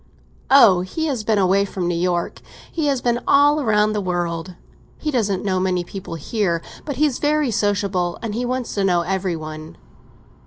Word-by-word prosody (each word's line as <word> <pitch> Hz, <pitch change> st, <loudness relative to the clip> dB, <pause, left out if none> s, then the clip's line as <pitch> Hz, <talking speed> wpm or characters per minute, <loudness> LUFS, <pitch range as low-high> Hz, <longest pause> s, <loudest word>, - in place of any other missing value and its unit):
"Oh, 220 Hz, -10 st, +7 dB
he 250 Hz, -, -3 dB
has 265 Hz, -8 st, -2 dB
been 220 Hz, 0 st, +1 dB
away 195 Hz, +1 st, +3 dB
from 190 Hz, -3 st, -3 dB
New 175 Hz, -, 0 dB
York—he 180 Hz, -, -3 dB
has 275 Hz, -3 st, 0 dB
been 240 Hz, -1 st, +1 dB
all 290 Hz, +1 st, +4 dB
round 215 Hz, -2 st, +2 dB
the 210 Hz, -, -1 dB
world. 175 Hz, -1 st, -3 dB, 0.4 s
He 305 Hz, -, -3 dB
doesn't 205 Hz, -7 st, 0 dB
know 185 Hz, -2 st, +1 dB
many 185 Hz, -1 st, 0 dB
people 190 Hz, -1 st, -7 dB
here, 170 Hz, 0 st, -1 dB, 0.2 s
but 285 Hz, -, -4 dB
he's 285 Hz, -1 st, +1 dB
very 295 Hz, -3 st, +1 dB
sociable, 200 Hz, -4 st, 0 dB
and 220 Hz, -2 st, -3 dB
he 240 Hz, +3 st, -2 dB
wants 250 Hz, 0 st, -3 dB
to 200 Hz, -, -1 dB
know 180 Hz, -3 st, +2 dB
every 185 Hz, 0 st, -1 dB
one." 155 Hz, 0 st, -8 dB
200 Hz, 180 wpm, -21 LUFS, 180-245 Hz, 0.4 s, Oh